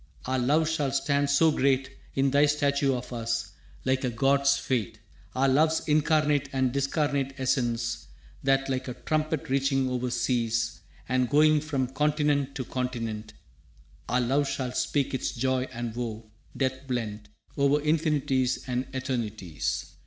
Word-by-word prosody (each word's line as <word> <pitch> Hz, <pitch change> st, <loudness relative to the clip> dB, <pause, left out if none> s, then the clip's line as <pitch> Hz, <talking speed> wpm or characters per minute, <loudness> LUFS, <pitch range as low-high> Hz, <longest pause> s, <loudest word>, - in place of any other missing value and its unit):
Our 130 Hz, 0 st, 0 dB
love 150 Hz, +6 st, +2 dB
shall 150 Hz, -4 st, 0 dB
stand 140 Hz, +1 st, +1 dB
so 155 Hz, +3 st, +5 dB
great 135 Hz, -2 st, +1 dB, 0.2 s
In 135 Hz, 0 st, +2 dB
thy 145 Hz, +2 st, +5 dB
statue 140 Hz, -2 st, +1 dB
of 125 Hz, 0 st, -6 dB
us, 115 Hz, -2 st, -2 dB, 0.3 s
like 130 Hz, +1 st, +1 dB
a 125 Hz, -, +1 dB
god's 140 Hz, +3 st, +3 dB
fate, 115 Hz, -5 st, -2 dB, 0.4 s
Our 135 Hz, +1 st, +3 dB
love's 155 Hz, +4 st, +2 dB
incarnate 150 Hz, -2 st, +2 dB
and 130 Hz, -2 st, +1 dB
discarnate 140 Hz, 0 st, 0 dB
essence, 120 Hz, -3 st, -1 dB, 0.3 s
That, 135 Hz, 0 st, +2 dB
like 130 Hz, -1 st, -2 dB
a 125 Hz, -, -5 dB
trumpet 155 Hz, -1 st, -1 dB
reaching 135 Hz, 0 st, +1 dB
over 125 Hz, 0 st, -1 dB
seas 115 Hz, -4 st, 0 dB, 0.3 s
And 125 Hz, -1 st, +1 dB
going 150 Hz, +1 st, +5 dB
from 145 Hz, -4 st, -1 dB
continent 145 Hz, +1 st, 0 dB
to 130 Hz, -, -3 dB
continent, 115 Hz, -4 st, -4 dB, 0.8 s
Our 125 Hz, -, +2 dB
love 135 Hz, +4 st, +1 dB
shall 130 Hz, -2 st, -2 dB
speak 140 Hz, +2 st, 0 dB
its 130 Hz, -, -2 dB
joy 130 Hz, +1 st, 0 dB
and 120 Hz, -2 st, -5 dB
woe, 110 Hz, -2 st, -5 dB, 0.3 s
death 130 Hz, 0 st, -1 dB
blent, 110 Hz, -4 st, -3 dB, 0.3 s
Over 140 Hz, +1 st, +3 dB
infinities 145 Hz, -4 st, +1 dB
and 125 Hz, +1 st, -2 dB
eternities! 110 Hz, -, -3 dB
130 Hz, 145 wpm, -27 LUFS, 125-145 Hz, 0.8 s, so